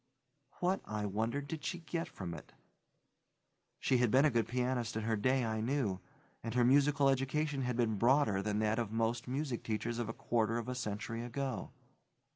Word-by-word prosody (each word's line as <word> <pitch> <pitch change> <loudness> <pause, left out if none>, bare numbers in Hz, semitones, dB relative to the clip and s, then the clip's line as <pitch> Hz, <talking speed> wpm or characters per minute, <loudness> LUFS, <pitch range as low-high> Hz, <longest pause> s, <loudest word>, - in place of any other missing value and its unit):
What, 185 +2 +1
I 105 -1 -3
wondered, 115 +8 -1
did 150 -1 -5
she 170 +6 -2
get 170 0 -3
from 90 -3 -6
it? 75 - -10 1.3
She 130 - +2
had 125 -2 +3
been 130 +6 +5
a 150 - +4
good 115 -3 +1
pianist 125 -2 -1
in 110 - -1
her 110 0 +1
day 130 +4 +2
I 110 -1 -1
knew, 115 -6 0 0.4
and 115 +1 -4
her 120 -1 +4
musical 140 +2 +4
education 135 +2 +1
had 125 -2 -1
been 110 -4 +1
broader 120 -5 +4
than 105 +1 -1
that 110 +1 +1
of 115 -3 -2
most 115 +3 0
music 130 -1 -2
teachers 115 +2 -2
of 115 -2 -2
a - - -3
quarter 115 -1 0
of 120 0 -4
a 125 - -2
century 115 -1 -3
ago. 130 +2 -3
120 Hz, 190 wpm, -34 LUFS, 110-135 Hz, 1.3 s, been